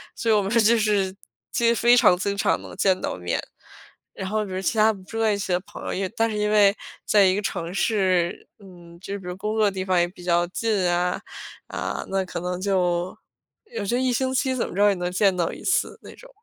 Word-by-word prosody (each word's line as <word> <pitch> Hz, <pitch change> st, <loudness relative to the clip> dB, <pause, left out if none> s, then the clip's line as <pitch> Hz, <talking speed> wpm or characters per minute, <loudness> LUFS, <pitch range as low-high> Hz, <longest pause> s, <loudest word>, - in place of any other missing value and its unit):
所 230 Hz, -, 0 dB
以 -, -, +5 dB
我 210 Hz, -, +3 dB
们 195 Hz, -, -3 dB
就 230 Hz, 0 st, +4 dB
是 205 Hz, -3 st, +1 dB, 0.4 s
其 235 Hz, -, +1 dB
实 235 Hz, -, +4 dB
非 240 Hz, +1 st, +5 dB
常 180 Hz, -, +6 dB
经 200 Hz, +2 st, -2 dB
常 -, -, +1 dB
能 -, -, -10 dB
见 190 Hz, -2 st, +2 dB
到 -, -, -3 dB
面。 90 Hz, -1 st, -2 dB, 0.7 s
然 190 Hz, -, -5 dB
后 215 Hz, +1 st, -1 dB
比 195 Hz, -, -9 dB
如 185 Hz, 0 st, -3 dB
其 220 Hz, +4 st, -1 dB
他 220 Hz, +1 st, +5 dB
不 195 Hz, -2 st, -13 dB
住 225 Hz, +4 st, -5 dB
在 220 Hz, -2 st, +3 dB
一 -, -, -1 dB
起 190 Hz, -, -3 dB
的 180 Hz, -, +2 dB
朋 -, -, -11 dB
友， -, -, -3 dB
也 190 Hz, 0 st, -1 dB
但 225 Hz, +2 st, 0 dB
是 210 Hz, -, -3 dB
因 210 Hz, 0 st, 0 dB
为 205 Hz, -2 st, +5 dB, 0.3 s
在 205 Hz, -2 st, +5 dB
一 185 Hz, 0 st, +3 dB
个 205 Hz, -, -1 dB
城 170 Hz, -3 st, -4 dB
市， 185 Hz, -4 st, 0 dB
嗯， 175 Hz, -4 st, -15 dB
就 200 Hz, -, -6 dB
是 200 Hz, -, -4 dB
比 190 Hz, -, -14 dB
如 180 Hz, -, -4 dB
工 210 Hz, +2 st, -3 dB
作 220 Hz, -1 st, +3 dB
的 205 Hz, -, +2 dB
地 190 Hz, -1 st, -4 dB
方 185 Hz, -2 st, +2 dB
也 175 Hz, -, +2 dB
比 180 Hz, 0 st, -14 dB
较 175 Hz, 0 st, +2 dB
近 195 Hz, -1 st, 0 dB
啊， 180 Hz, +1 st, 0 dB, 0.5 s
啊， -, -, -4 dB
那 195 Hz, 0 st, 0 dB
可 180 Hz, -, -5 dB
能 180 Hz, +1 st, -3 dB
就 180 Hz, -2 st, 0 dB, 0.5 s
有 465 Hz, +2 st, -6 dB
时 235 Hz, -, 0 dB
候 250 Hz, -, 0 dB
1 255 Hz, -1 st, +1 dB
星 260 Hz, +2 st, 0 dB
期 260 Hz, 0 st, 0 dB
怎 250 Hz, -, -1 dB
么 -, -, -9 dB
着 205 Hz, +1 st, +4 dB
也 -, -, +3 dB
能 180 Hz, 0 st, -3 dB
见 195 Hz, +1 st, +2 dB
到 175 Hz, -2 st, -1 dB
1 -, -, -10 dB
次， -, -, 0 dB
那 -, -, -11 dB
种。 -, -, -16 dB
195 Hz, 275 characters per minute, -24 LUFS, 180-215 Hz, 0.7 s, 常